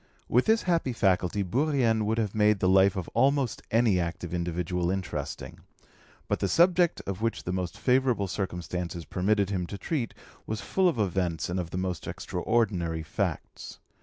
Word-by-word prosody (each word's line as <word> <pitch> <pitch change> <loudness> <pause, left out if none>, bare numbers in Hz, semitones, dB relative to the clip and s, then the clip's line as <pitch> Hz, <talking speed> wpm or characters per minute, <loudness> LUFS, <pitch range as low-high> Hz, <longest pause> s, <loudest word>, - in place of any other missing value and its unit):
With 125 - +3
this 220 +1 +3
happy 165 -8 +1
faculty 95 -2 +1
Bourrienne 120 - +1
would 110 +1 0
have 110 -4 -1
made 105 -1 +3
the 95 - +2
life 95 +2 +5
of 95 -3 -4
almost 135 0 +1
any 115 -5 +3
active 85 0 -4
individual 85 0 -1
interesting; 95 -1 -4 0.7
but - - 0
the - - 0
subject 175 0 +3
of 100 +1 -4
which 115 0 -1
the 90 - -3
most 90 -2 -3
favourable 125 -6 +2
circumstances 90 -3 -4
permitted 100 +5 +1
him 90 -3 -1
to 100 - -6
treat 130 -1 -3 0.3
was 110 0 -3
full 190 - +2
of 155 - -3
events 90 -6 -1
and 90 - -1
of 85 -2 -4
the 90 - -5
most 90 -3 -3
extraordinary 90 -8 -1
facts. 75 - -4
100 Hz, 165 wpm, -28 LUFS, 90-120 Hz, 0.7 s, life